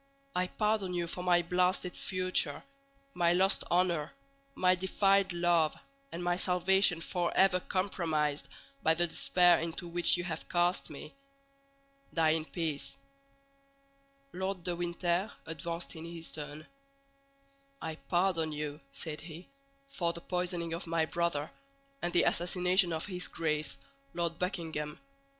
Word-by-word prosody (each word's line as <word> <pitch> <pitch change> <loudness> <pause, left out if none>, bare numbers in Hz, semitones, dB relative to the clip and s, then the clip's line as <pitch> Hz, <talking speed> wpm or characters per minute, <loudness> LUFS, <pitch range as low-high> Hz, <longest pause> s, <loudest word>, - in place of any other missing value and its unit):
I 180 0 +1
pardon 210 -3 0
you 175 -1 0
for 180 +1 -5
my 175 -1 +4
blasted 180 +1 +1
future, 185 -5 0 0.5
my 170 -1 +3
lost 190 +2 +3
honor, 175 -4 +2 0.4
my 185 0 +4
defiled 195 +1 +2
love, 170 -2 +2 0.4
and 175 - -5
my 175 0 +1
salvation 180 -1 +3
forever 180 +2 +2
compromised 160 -7 -1 0.3
by 160 0 +4
the 175 +1 +3
despair 175 +1 +4
into 165 +2 -4
which 175 +1 +2
you 175 - -2
have 165 -3 -5
cast 175 +1 +1
me. 150 - -9 1.0
Die 160 -2 +4
in 160 0 0
peace!" 160 -4 -2 1.4
Lord 190 -1 -3
de 175 0 -1
Winter 175 +2 0
advanced 165 +2 -4
in 160 0 -7
his 170 -1 -7
turn. 150 0 -7 1.1
"I 160 - -4
pardon 175 -3 +1
you," 150 0 -4
said 155 -2 -5
he, 165 +2 -10 0.4
"for 175 -11 -1
the 170 - -7
poisoning 175 -2 -2
of 170 +1 -4
my 165 -1 +1
brother, 165 -3 -1 0.5
and 175 - -1
the 175 -1 +4
assassination 180 +1 +3
of 160 -1 -2
his 180 -3 -4
Grace, 155 -2 -1 0.4
Lord 170 -1 -1
Buckingham. 160 -5 -3
175 Hz, 130 wpm, -32 LUFS, 165-180 Hz, 1.4 s, my